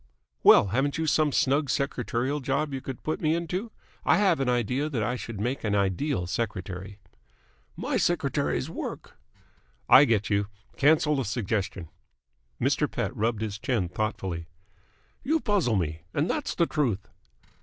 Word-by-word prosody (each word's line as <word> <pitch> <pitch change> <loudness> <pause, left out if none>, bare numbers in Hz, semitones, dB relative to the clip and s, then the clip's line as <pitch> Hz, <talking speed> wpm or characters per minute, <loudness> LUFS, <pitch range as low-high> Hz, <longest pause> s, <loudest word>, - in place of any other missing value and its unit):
"Well, 100 - +7
haven't 135 - 0
you 160 - -1
some 155 -1 +2
snug 140 +2 +2
secretarial 130 +1 -1
job 140 +2 -1
you 135 - -3
could 130 -2 -7
put 155 - -2
me 155 0 +2
into? 180 +6 -3 0.3
I - - +4
have 190 -6 +3
an 135 -2 +1
idea 125 +5 0
that 120 -8 -1
I 120 +4 -1
should 115 -4 -6
make 125 +5 -2
an 105 -2 0
ideal 100 - 0
secretary." 95 -1 -4 0.8
"My - - -1
secretaries - - 0
work." - - -6 0.7
"I 140 - +8
get 110 -5 +1
you. 100 0 +1 0.3
Cancel 150 +1 +4
the 135 - 0
suggestion." 100 -5 -2 0.7
Mr. - - +1
Pett - - -3
rubbed 110 0 0
his 105 -2 -4
chin 110 -7 -1
thoughtfully. 90 -4 -3 0.8
"You 315 +5 +2
puzzle 195 - +1
me. 80 -4 -2
And 150 +4 +1
that's 300 +6 -2
the 170 - +3
truth." 125 - -1
125 Hz, 155 wpm, -27 LUFS, 100-150 Hz, 0.8 s, I